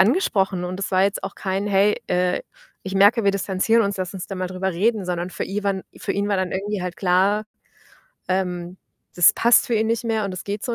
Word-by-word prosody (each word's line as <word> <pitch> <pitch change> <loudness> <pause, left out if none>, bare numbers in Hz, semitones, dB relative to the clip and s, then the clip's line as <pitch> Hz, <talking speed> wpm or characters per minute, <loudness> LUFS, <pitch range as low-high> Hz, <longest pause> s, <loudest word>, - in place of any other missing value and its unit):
angesprochen 195 - +2
und 180 +1 -4
das 195 - -3
war 190 0 +3
jetzt 200 +1 -1
auch - - -6
kein: 195 +1 -2
„Hey, 200 +1 +2
äh, 180 0 +1 0.4
ich 190 0 -4
merke, 205 +4 +5
wir 200 - +4
distanzieren 200 +3 +1
uns, 200 0 -2
lass 185 +1 -4
uns 185 - -6
da 195 - -6
mal 185 -1 -3
drüber 185 +1 -2
reden.“, 210 +4 +1
sondern 180 0 -3
für - - -4
iwan 195 -1 -2
für - - -5
ihn 200 +1 0
war 205 - +1
dann 185 -1 -1
irgendwie 200 +1 -3
halt 180 -1 -5
klar, 190 +4 +2 0.8
ähm, 180 -1 -2 0.4
das 175 -1 +6
passt 235 +3 +4
für 245 - -4
ihn 220 0 +1
nicht 230 +1 -1
mehr 220 -3 0
und 195 - -5
das 185 - -7
geht 205 +1 -4
so 240 - -2
195 Hz, 230 wpm, -22 LUFS, 185-210 Hz, 0.8 s, das